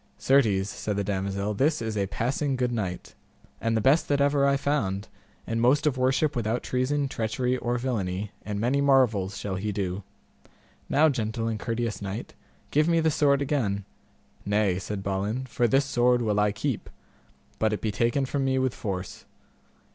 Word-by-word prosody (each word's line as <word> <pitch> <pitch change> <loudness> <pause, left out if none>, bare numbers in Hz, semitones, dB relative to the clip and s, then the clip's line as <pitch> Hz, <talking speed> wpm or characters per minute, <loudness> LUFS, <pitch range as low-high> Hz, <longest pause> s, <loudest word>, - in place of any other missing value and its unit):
Certes, 110 -8 +3
said 105 +1 -3
the 100 - 0
damosel, 100 +1 -2
this 145 +9 +2
is 110 -1 -3
a 100 -2 0
passing 135 +7 -1
good 125 -1 0
knight, 95 -6 -4 0.5
and 115 0 +1
the - - +1
best 140 +9 +4
that 145 -1 +1
ever 140 0 +3
I 140 0 +3
found, 110 -9 -1 0.4
and 115 0 -1
most 140 +5 +3
of 150 -3 +2
worship 135 +4 +1
without 115 0 -1
treason, 140 +3 0
treachery, 125 +1 -1
or 120 0 -1
villainy, 105 -5 -2
and 105 -1 -4
many 125 +6 +1
marvels 115 -9 +3
shall 95 -2 -3
he 105 +3 -2
do. 95 -1 -2 0.9
Now, 150 +3 +5
gentle 115 -3 -2
and 110 -2 -2
courteous 115 -1 -2
knight, 100 +3 -5 0.4
give 150 +2 +3
me 165 -1 +3
the 160 -1 +2
sword 140 -1 +3
again. 110 -9 -1 0.6
Nay, 100 -3 +1
said 95 +1 -5
Balin, 100 +6 -2
for 120 -1 +1
this 135 +4 +3
sword 125 -2 +2
will 105 -2 +1
I 105 0 +3
keep, 110 +3 -3 0.7
but 110 -1 +2
it 105 - -1
be 110 - -1
taken 120 +7 +1
from 135 +1 -1
me 130 0 +1
with 130 -2 +1
force. 95 -2 -5
115 Hz, 175 wpm, -26 LUFS, 100-135 Hz, 0.9 s, Now